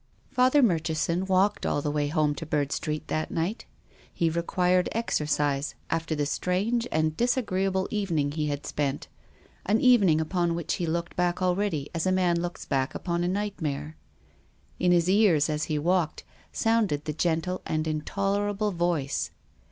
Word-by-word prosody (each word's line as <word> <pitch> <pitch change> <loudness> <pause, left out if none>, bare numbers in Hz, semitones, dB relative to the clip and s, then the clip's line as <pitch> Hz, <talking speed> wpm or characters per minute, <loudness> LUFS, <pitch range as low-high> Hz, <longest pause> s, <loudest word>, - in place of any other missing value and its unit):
Father 255 +3 +4
Murchison 170 -1 +1
walked 195 +2 +2
all - - 0
the 145 0 -2
way 145 -1 0
home 150 -1 +1
to 160 - -6
Bird 145 -2 0
Street 150 +1 -3
that 155 - -2
iii^^ht. 175 +7 -2 0.5
He 165 -1 0
required 180 +2 +1
exercise 150 -9 0 0.2
after 165 -1 -1
the 145 -1 0
strange 200 +10 0
and 155 0 +1
disagreeable 195 -6 0
evening 170 -9 0
he 150 0 -2
had 145 0 -3
spent, 140 -2 -2 0.6
an 215 +3 +3
evening 205 -12 +5
upon 170 +1 0
which 170 -2 -2
lie 170 - 0
looked 170 +1 -2
back 175 0 0
al 180 -1 +2
ready 180 -8 -1
as 165 +2 -1
a - - +3
man 180 -2 +2
looks 175 0 -5
back 135 -1 -1
upon 170 -1 -2
a - - 0
nightmare. 160 -7 -3 0.8
In 180 0 +3
his 175 -1 +3
ears, 185 -7 +4
as 150 0 -1
he 155 - -1
walked, 175 +2 0 0.3
sounded 225 -10 +1
the 150 - -2
gentle 170 +3 -1
and 155 0 -1
in 155 -1 -1
tolerable 205 +4 -1
voice. 170 -6 -1
170 Hz, 165 wpm, -27 LUFS, 155-190 Hz, 0.8 s, evening